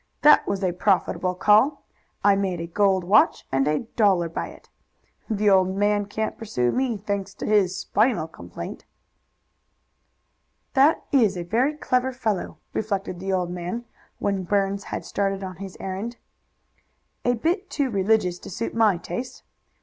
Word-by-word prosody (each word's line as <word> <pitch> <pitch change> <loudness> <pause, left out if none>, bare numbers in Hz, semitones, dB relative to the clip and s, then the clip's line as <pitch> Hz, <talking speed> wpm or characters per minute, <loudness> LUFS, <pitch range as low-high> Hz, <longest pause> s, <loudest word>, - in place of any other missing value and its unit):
That 300 - +7
was 200 0 -2
a 185 - +2
profitable 180 0 +1
call. 215 +10 +4 0.4
I 200 0 +5
made 190 -3 -1
a 165 - -3
gold 190 +2 +2
watch 200 +5 +4
and 135 +1 +2
a 150 0 +1
dollar 190 -6 +3
by 165 - -4
it. - - -14 0.6
The 210 -1 0
old 190 0 +3
man 205 0 +1
can't 220 +1 -3
pursue 125 - 0
me, 255 -4 0
thanks 200 -1 -4
to - - -6
his 200 -4 +2
spinal 210 -6 +1
complaint." 160 - -9 1.9
"That 280 +4 +4
is 220 -9 +3
a 175 - -3
very 245 - +1
clever 255 -3 0
fellow," 220 -7 -2 0.2
reflected 200 -4 -2
the 195 +1 -3
old 180 -2 0
man, 180 +7 -4 0.3
when 200 -1 -1
Burns 195 +1 0
had - - -5
started 195 -1 -1
on 185 -1 -6
his 195 -1 -8
errand. 200 +6 -5 1.1
"A 245 0 +2
bit 355 - -1
too 280 -4 -1
religious 195 -3 +1
to - - -10
suit 230 +4 -4
my 220 -5 +3
taste. 245 +8 -6
200 Hz, 155 wpm, -24 LUFS, 185-225 Hz, 1.9 s, That